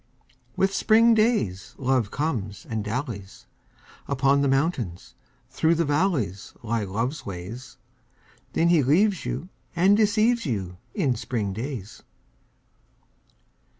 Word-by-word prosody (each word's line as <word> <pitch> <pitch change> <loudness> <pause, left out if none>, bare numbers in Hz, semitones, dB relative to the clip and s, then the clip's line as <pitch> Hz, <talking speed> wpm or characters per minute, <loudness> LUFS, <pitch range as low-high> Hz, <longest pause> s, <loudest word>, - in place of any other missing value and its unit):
With 195 0 +1
spring 230 +3 +5
days 215 - +1
Love 130 -5 +1
comes 110 -10 -3
and 110 -2 -3
dallies: 105 -3 -5 0.6
Upon 140 0 +2
the 140 - +2
mountains, 135 - -1 0.4
through 160 +5 +2
the 165 0 +1
valleys 145 - 0
Lie 115 -2 -1
Love's 115 +10 -3
ways. 100 +7 -8 0.8
Then 170 - +3
he 170 -3 +5
leaves 185 +9 +2
you 180 - -4 0.3
and 190 +4 +5
deceives 220 +3 +3
you 95 - -3 0.2
In 140 -10 +1
spring 110 -4 -3
days. 115 -2 -6
135 Hz, 115 wpm, -25 LUFS, 105-175 Hz, 0.8 s, spring